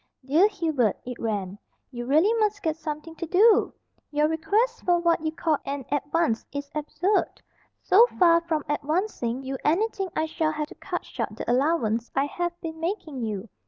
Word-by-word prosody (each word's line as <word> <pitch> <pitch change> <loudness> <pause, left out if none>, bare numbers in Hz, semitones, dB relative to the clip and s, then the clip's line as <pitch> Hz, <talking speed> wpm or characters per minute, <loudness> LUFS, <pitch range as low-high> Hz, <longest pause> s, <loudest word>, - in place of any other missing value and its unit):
"Dear 315 +9 +5
Hubert," 315 - 0
it 250 -1 -6
ran, 205 -3 -3 0.3
"you 240 -1 -6
really 320 - +4
must 420 -2 0
get 320 -2 0
something 315 0 -6
to 335 - -4
do! 410 +6 +5 0.4
Your 300 0 +2
request 425 +10 0
for 355 -1 +3
what 340 -1 +2
you 315 - 0
call 315 -1 0
an 275 -2 -4
advance 290 -3 0
is 285 0 -6
absurd. 335 +6 0 0.4
So 450 +6 +6
far 335 -2 +5
from 320 -3 -2
advancing 295 - -1
you 265 0 -4
anything 390 +4 +1
I 315 - +1
shall 315 0 -1
have 300 0 -3
to - - -10
cut - - -5
short - - -4
the - - -6
allowance 245 -4 +1
I 270 +1 +2
have 345 +3 -3
been 320 -1 -6
making 325 -6 -3
you. 210 -1 -4
315 Hz, 175 wpm, -26 LUFS, 275-350 Hz, 0.4 s, So